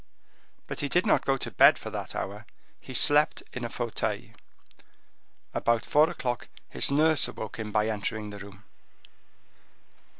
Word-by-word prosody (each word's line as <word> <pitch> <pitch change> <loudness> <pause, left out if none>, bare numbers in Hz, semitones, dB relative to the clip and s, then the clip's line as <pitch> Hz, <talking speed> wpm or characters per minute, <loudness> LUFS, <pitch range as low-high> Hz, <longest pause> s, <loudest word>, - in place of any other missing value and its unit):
But - - -6
he 145 - -2
did 180 +4 +2
not - - +3
go 135 0 +3
to 115 - -4
bed 90 - +6
for - - -8
that - - -5
hour; - - -5 0.3
he 130 - -9
slept 150 +4 +3
in 125 - -5
a 120 - -3
fauteuil. 120 -2 -3 1.2
About 115 -1 +1
four 150 +2 +4
o'clock 125 -8 -3 0.2
his - - +2
nurse 155 +1 +4
awoke 110 +1 -7
him 110 -1 -4
by 105 0 +2
entering 105 0 -3
the 100 - -9
room. 100 0 -12
120 Hz, 155 wpm, -28 LUFS, 105-145 Hz, 1.2 s, bed